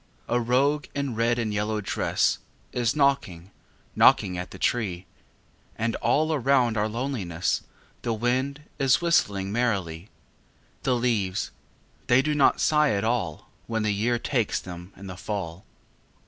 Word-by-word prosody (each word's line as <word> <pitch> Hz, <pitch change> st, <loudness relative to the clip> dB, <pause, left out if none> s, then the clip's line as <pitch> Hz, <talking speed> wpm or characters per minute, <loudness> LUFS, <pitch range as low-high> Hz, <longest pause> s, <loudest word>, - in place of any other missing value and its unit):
A 120 Hz, -, +1 dB
rogue 135 Hz, +5 st, +2 dB
in 140 Hz, -3 st, -2 dB
red 115 Hz, +2 st, +1 dB
and 110 Hz, -3 st, -1 dB
yellow 105 Hz, +1 st, -1 dB
dress 100 Hz, -, 0 dB, 0.3 s
Is 120 Hz, +1 st, 0 dB
knocking, 135 Hz, -, +1 dB, 0.4 s
knocking 90 Hz, -2 st, +5 dB
at 90 Hz, 0 st, -5 dB
the -, -, -10 dB
tree; 95 Hz, -7 st, -1 dB, 0.7 s
And 115 Hz, 0 st, -1 dB
all 155 Hz, +7 st, +2 dB
around 130 Hz, -4 st, +2 dB
our 105 Hz, 0 st, +1 dB
loneliness 110 Hz, -8 st, -2 dB, 0.4 s
The 120 Hz, -, -2 dB
wind 130 Hz, +5 st, -1 dB, 0.2 s
is 135 Hz, -1 st, +4 dB
whistling 100 Hz, -, +1 dB
merrily. 100 Hz, -6 st, -1 dB, 0.7 s
The 130 Hz, -, +1 dB
leavesâthey 120 Hz, +2 st, -1 dB
do 150 Hz, +1 st, 0 dB
not 145 Hz, -2 st, +4 dB
sigh 150 Hz, -1 st, +3 dB
at 100 Hz, 0 st, -1 dB
all 110 Hz, -9 st, -2 dB, 0.2 s
When 115 Hz, -1 st, -1 dB
the 105 Hz, -1 st, +1 dB
year 115 Hz, +4 st, +1 dB
takes 120 Hz, -2 st, 0 dB
them 90 Hz, 0 st, -9 dB
in 100 Hz, -, -10 dB
the 90 Hz, -1 st, -7 dB
fall. 95 Hz, -2 st, -5 dB
115 Hz, 140 wpm, -26 LUFS, 100-130 Hz, 0.7 s, knocking